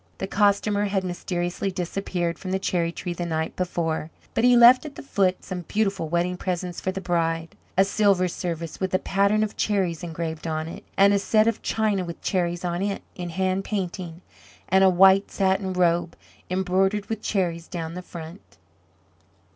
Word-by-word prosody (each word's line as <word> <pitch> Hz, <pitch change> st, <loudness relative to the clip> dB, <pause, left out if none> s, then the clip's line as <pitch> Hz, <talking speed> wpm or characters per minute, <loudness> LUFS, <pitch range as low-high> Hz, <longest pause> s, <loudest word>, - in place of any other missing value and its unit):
The -, -, -3 dB
Costumer 205 Hz, +1 st, +2 dB
had 195 Hz, -1 st, 0 dB
mysteriously 175 Hz, +1 st, -2 dB
disappeared 175 Hz, -2 st, -3 dB
from 190 Hz, -, -6 dB
the 190 Hz, -, +1 dB
cherry 175 Hz, -3 st, 0 dB
tree 175 Hz, +1 st, -5 dB
the 175 Hz, -, -4 dB
night 160 Hz, -1 st, -2 dB
before, 165 Hz, -3 st, -2 dB, 0.2 s
but 225 Hz, -, 0 dB
he 245 Hz, 0 st, +6 dB
left 240 Hz, +2 st, +8 dB
at 300 Hz, -2 st, -8 dB
the -, -, -9 dB
foot 190 Hz, -8 st, 0 dB
some 180 Hz, -1 st, -5 dB
beautiful 195 Hz, -2 st, -1 dB
wedding 175 Hz, +2 st, 0 dB
presents 180 Hz, -1 st, -3 dB
for 185 Hz, -, -1 dB
the 195 Hz, -, -4 dB
bride 165 Hz, -2 st, -1 dB, 0.2 s
a 190 Hz, -, +6 dB
silver 200 Hz, -2 st, +3 dB
service 170 Hz, -2 st, -4 dB
with 190 Hz, -1 st, 0 dB
a -, -, +5 dB
pattern 200 Hz, +3 st, +2 dB
of 215 Hz, -, -3 dB
cherries 190 Hz, -6 st, 0 dB
engraved 165 Hz, -2 st, -4 dB
on 155 Hz, 0 st, -2 dB
it, 190 Hz, +5 st, -8 dB
and 200 Hz, +1 st, +6 dB
a 200 Hz, -, +3 dB
set 215 Hz, +2 st, +3 dB
of 230 Hz, -1 st, 0 dB
china 210 Hz, -4 st, 0 dB
with 170 Hz, -1 st, -7 dB
cherries 175 Hz, -1 st, -1 dB
on 175 Hz, +1 st, -1 dB
it, 200 Hz, 0 st, -2 dB
in 175 Hz, -1 st, -6 dB
hand 185 Hz, +2 st, 0 dB
painting, 180 Hz, -4 st, -4 dB, 0.5 s
and 190 Hz, +1 st, +5 dB
a 190 Hz, -, +7 dB
white 190 Hz, +2 st, +5 dB
satin 190 Hz, 0 st, 0 dB
robe, 175 Hz, -2 st, +1 dB, 0.3 s
embroidered 190 Hz, +2 st, +1 dB
with 220 Hz, 0 st, -4 dB
cherries 170 Hz, -4 st, -1 dB
down 165 Hz, -3 st, -5 dB
the 180 Hz, -, -6 dB
front. 170 Hz, +1 st, -9 dB
185 Hz, 180 wpm, -25 LUFS, 170-195 Hz, 0.5 s, left